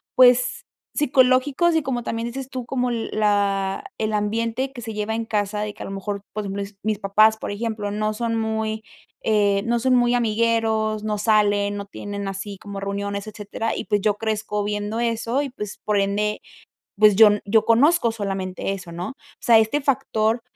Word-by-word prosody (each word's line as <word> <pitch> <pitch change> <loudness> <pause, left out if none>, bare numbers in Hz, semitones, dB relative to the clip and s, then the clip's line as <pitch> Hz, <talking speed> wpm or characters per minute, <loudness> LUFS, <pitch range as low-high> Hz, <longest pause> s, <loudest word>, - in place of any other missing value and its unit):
pues, 250 -1 +5 0.3
psicológicos 275 +4 +3
y, 315 - 0
como 245 -3 -2
también 230 0 -3
dices 265 +2 -6
tú, 255 -2 -5
como 250 0 -1
l 230 -2 -3
la 200 -2 +1 0.2
el 215 0 -1
ambiente 230 +5 -1
que 240 - -8
se 225 -1 -6
lleva 210 +1 -2
en 230 - -2
casa, 210 -1 -1
de 210 -1 -3
que - - -9
a - - -6
lo - - -6
mejor, 200 0 -4
pues, 205 -2 -4
bles 200 +1 -5
mis 215 -1 -1
papás, 215 +2 +4
por - - -5
ejemplo, 210 -1 -3
no 215 +1 -1
son 230 +1 -2
muy, 220 0 -2 0.4
eh, 205 -2 +2
no 235 0 +2
son 255 +1 +3
muy 240 0 +3
amigueros, 220 -2 +1
no 210 -1 -1
salen, 205 -1 +2
no 200 - -5
tienen 200 0 -6
así 195 +1 -5
como 200 0 -8
reuniones, 200 0 -3
etcétera, 215 +1 -4
y - - -4
pues, 205 -1 +1
yo 210 0 +2
crezco 210 -1 -2
viendo 210 +2 -2
eso, 235 +2 0
y 285 - -3
pues, 210 -5 -7
por 210 -1 +1
ende, 205 +2 0 0.6
pues, 210 -1 +6
yo 220 +2 +9
n 205 0 +2
yo 215 +1 +3
conozco 240 +3 +4
solamente 195 -3 -3
eso, 185 -3 -8
¿no? 175 +7 -5
O - - -15 0.2
sea, 230 -2 +6
este 220 +7 +1
factor, 245 -5 0
215 Hz, 195 wpm, -23 LUFS, 205-230 Hz, 0.6 s, yo